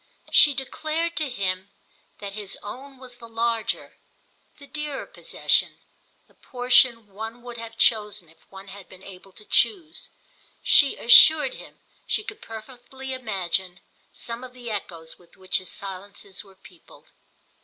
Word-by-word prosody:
She 290 Hz, -2 st, +7 dB
declared 315 Hz, +5 st, -2 dB
to 305 Hz, -3 st, 0 dB
him 190 Hz, -4 st, -2 dB, 0.5 s
that 200 Hz, -1 st, -7 dB
his 205 Hz, -2 st, -4 dB
own 265 Hz, +6 st, -9 dB
was 250 Hz, -1 st, -13 dB
the 235 Hz, -1 st, -12 dB
larger, 230 Hz, 0 st, -2 dB, 0.6 s
the 285 Hz, -, -14 dB
dearer 300 Hz, -1 st, -5 dB
possession—the -, -, -2 dB
portion 245 Hz, -2 st, +3 dB
one 220 Hz, +4 st, -8 dB
would 240 Hz, -1 st, -8 dB
have 230 Hz, 0 st, -9 dB
chosen 210 Hz, -6 st, +1 dB
if 160 Hz, -, -25 dB
one 195 Hz, 0 st, -12 dB
had 195 Hz, -1 st, -12 dB
been 185 Hz, 0 st, -15 dB
able 195 Hz, 0 st, -13 dB
to 195 Hz, +5 st, -15 dB
choose; 330 Hz, -, 0 dB, 0.5 s
she 280 Hz, -2 st, +6 dB
assured 310 Hz, -, +7 dB
him -, -, -13 dB, 0.3 s
she 425 Hz, -, 0 dB
could 425 Hz, +1 st, -9 dB
perfectly 250 Hz, +4 st, -9 dB
imagine 190 Hz, -6 st, -2 dB, 0.3 s
some 235 Hz, +1 st, -3 dB
of 255 Hz, -1 st, -10 dB
the 245 Hz, -2 st, -8 dB
echoes 165 Hz, -6 st, -6 dB
with 175 Hz, -1 st, -22 dB
which 190 Hz, 0 st, 0 dB
his 185 Hz, -, -3 dB
silences 195 Hz, 0 st, -6 dB
were 195 Hz, -2 st, -19 dB
peopled. 180 Hz, -2 st, -19 dB
225 Hz, 145 wpm, -24 LUFS, 195-260 Hz, 0.6 s, She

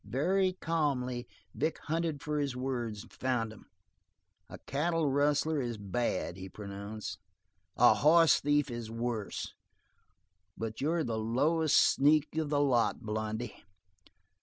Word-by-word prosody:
Very 185 Hz, +8 st, +1 dB
calmly, 135 Hz, -8 st, -1 dB, 0.3 s
Vic 155 Hz, +3 st, -1 dB
hunted 160 Hz, -2 st, -2 dB
for 150 Hz, 0 st, -1 dB
his 140 Hz, -3 st, -1 dB
words, 120 Hz, -5 st, -3 dB
found 125 Hz, -4 st, -1 dB
them. 110 Hz, -, -15 dB, 0.8 s
"A -, -, -8 dB
cattle 155 Hz, +1 st, 0 dB
rustler 145 Hz, +2 st, +2 dB
is 120 Hz, -3 st, -3 dB
bad," 100 Hz, -3 st, -2 dB
he 95 Hz, 0 st, -8 dB
pronounced, 100 Hz, +2 st, -7 dB, 0.6 s
"a 120 Hz, -, +7 dB
hoss 160 Hz, +7 st, +5 dB
thief 145 Hz, -1 st, +1 dB
is 120 Hz, -2 st, -5 dB
worse, 115 Hz, -2 st, -3 dB, 1.0 s
but 110 Hz, -1 st, -5 dB
you're 160 Hz, +3 st, +1 dB
the 115 Hz, -4 st, -2 dB
lowest 150 Hz, +8 st, +2 dB
sneak 150 Hz, +2 st, +4 dB
of 160 Hz, -2 st, -1 dB
the 145 Hz, -1 st, +1 dB
lot, 125 Hz, -5 st, +2 dB
Blondy." 110 Hz, +1 st, -4 dB
130 Hz, 125 wpm, -31 LUFS, 115-150 Hz, 1.0 s, a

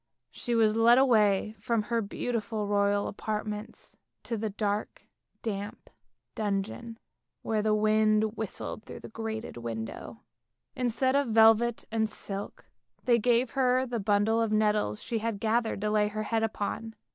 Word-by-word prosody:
" -, -, -57 dB
She 240 Hz, -, -3 dB
was 220 Hz, -1 st, +3 dB
led 235 Hz, +2 st, +6 dB
away 215 Hz, -5 st, +3 dB
from 225 Hz, +1 st, 0 dB
her 230 Hz, +1 st, 0 dB
beautiful 215 Hz, 0 st, -3 dB
royal 200 Hz, 0 st, +1 dB
apartments 210 Hz, +1 st, -5 dB, 0.3 s
to -, -, -5 dB
a 220 Hz, -1 st, -1 dB
dark 205 Hz, +1 st, -3 dB, 0.4 s
damp 205 Hz, -2 st, -5 dB, 0.4 s
dungeon, 215 Hz, +3 st, -3 dB, 0.5 s
where 220 Hz, -1 st, 0 dB
the 215 Hz, 0 st, +2 dB
wind 215 Hz, 0 st, +2 dB
whistled 220 Hz, 0 st, -4 dB
through -, -, -10 dB
the -, -, -9 dB
grated 220 Hz, -, -5 dB
window. 115 Hz, -, -6 dB, 0.5 s
Instead 255 Hz, +1 st, +1 dB
of 280 Hz, -1 st, +2 dB
velvet 225 Hz, +1 st, +4 dB
and 220 Hz, -1 st, +1 dB
silk 200 Hz, -1 st, -5 dB, 0.4 s
they 240 Hz, -2 st, +4 dB
gave 240 Hz, +1 st, +2 dB
her 255 Hz, -1 st, +2 dB
the 240 Hz, -2 st, -3 dB
bundle 205 Hz, +2 st, +2 dB
of 225 Hz, -1 st, 0 dB
nettles 210 Hz, -, +1 dB
she 230 Hz, -, -2 dB
had 220 Hz, -2 st, -3 dB
gathered 225 Hz, -1 st, 0 dB
to 210 Hz, 0 st, 0 dB
lay 210 Hz, -1 st, +3 dB
her 215 Hz, +1 st, -3 dB
head 225 Hz, +1 st, 0 dB
upon. 225 Hz, +1 st, -3 dB
220 Hz, 150 wpm, -29 LUFS, 210-230 Hz, 0.5 s, led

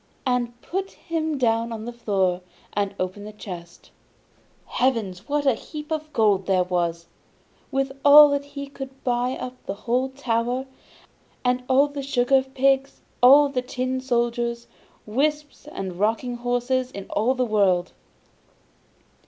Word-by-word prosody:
and 240 Hz, -2 st, -1 dB
put 385 Hz, +2 st, -3 dB
him 320 Hz, -3 st, -3 dB
down 230 Hz, -2 st, +1 dB
on 220 Hz, -1 st, -5 dB
the 240 Hz, -, -6 dB
floor, 190 Hz, -6 st, 0 dB, 0.3 s
and 200 Hz, -1 st, -1 dB
opened 185 Hz, +3 st, -4 dB
the -, -, -7 dB
chest. 180 Hz, -5 st, -10 dB, 0.7 s
Heavens! 225 Hz, -6 st, -1 dB
what 290 Hz, 0 st, 0 dB
a 270 Hz, -, +5 dB
heap 300 Hz, +6 st, -8 dB
of 310 Hz, -1 st, -3 dB
gold 205 Hz, -6 st, +2 dB
there 185 Hz, -2 st, +3 dB
was! 170 Hz, -2 st, -1 dB, 0.6 s
With 270 Hz, 0 st, -1 dB
all 295 Hz, +1 st, +10 dB
that 285 Hz, 0 st, 0 dB
he 280 Hz, 0 st, -7 dB
could 270 Hz, -1 st, -10 dB
buy 245 Hz, 0 st, 0 dB
up 255 Hz, -1 st, -7 dB
the 195 Hz, -, -3 dB
whole 250 Hz, +3 st, +1 dB
town, 250 Hz, -1 st, -1 dB, 0.8 s
and 250 Hz, 0 st, +2 dB
all 270 Hz, +2 st, +5 dB
the 285 Hz, -1 st, -6 dB
sugar 270 Hz, -1 st, +2 dB
pigs, 270 Hz, +1 st, 0 dB, 0.2 s
all 280 Hz, +4 st, +8 dB
the 260 Hz, -2 st, -1 dB
tin 255 Hz, +1 st, -3 dB
soldiers, 235 Hz, -1 st, -1 dB, 0.4 s
whips 295 Hz, +6 st, -2 dB
and 185 Hz, -, -6 dB
rocking 230 Hz, +4 st, 0 dB
horses 245 Hz, +1 st, 0 dB
in 200 Hz, -6 st, -8 dB
the -, -, -10 dB
whole 235 Hz, +6 st, +2 dB
world. 200 Hz, -8 st, +2 dB
250 Hz, 145 wpm, -24 LUFS, 215-270 Hz, 0.8 s, all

